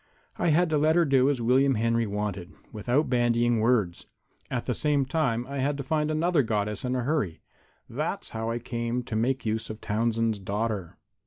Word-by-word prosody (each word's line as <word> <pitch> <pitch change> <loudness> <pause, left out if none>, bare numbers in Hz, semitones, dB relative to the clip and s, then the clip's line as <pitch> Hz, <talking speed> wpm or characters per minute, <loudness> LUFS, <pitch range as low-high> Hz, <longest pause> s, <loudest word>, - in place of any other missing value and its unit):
I - - +1
had 170 +3 +4
to 150 - +3
let 155 +2 +3
her 175 -1 +4
do 135 -2 +4
as 130 -5 -1
William 130 +3 +4
Henry 115 +1 +1
wanted, 100 -3 -3 0.2
without 120 +8 0
bandying 120 -1 +2
words. 110 -6 +1 0.4
At - - -2
the - - 0
same 145 -2 +1
time 130 -5 0
I 140 +1 -5
had 140 +2 0
to 140 - -4
find 150 +2 0
another 160 +1 +2
Goddess 105 -3 -2
in 125 0 -1
a 125 - -1
hurry. 120 - -1 0.4
That's - - -3
how 110 0 -3
I 115 - -1
came 120 0 -3
to 120 -2 -5
make 125 +4 0
use 110 +1 -1
of 110 0 -6
Townsend's 115 0 0
daughter." 100 -1 -3
120 Hz, 190 wpm, -27 LUFS, 110-140 Hz, 0.4 s, had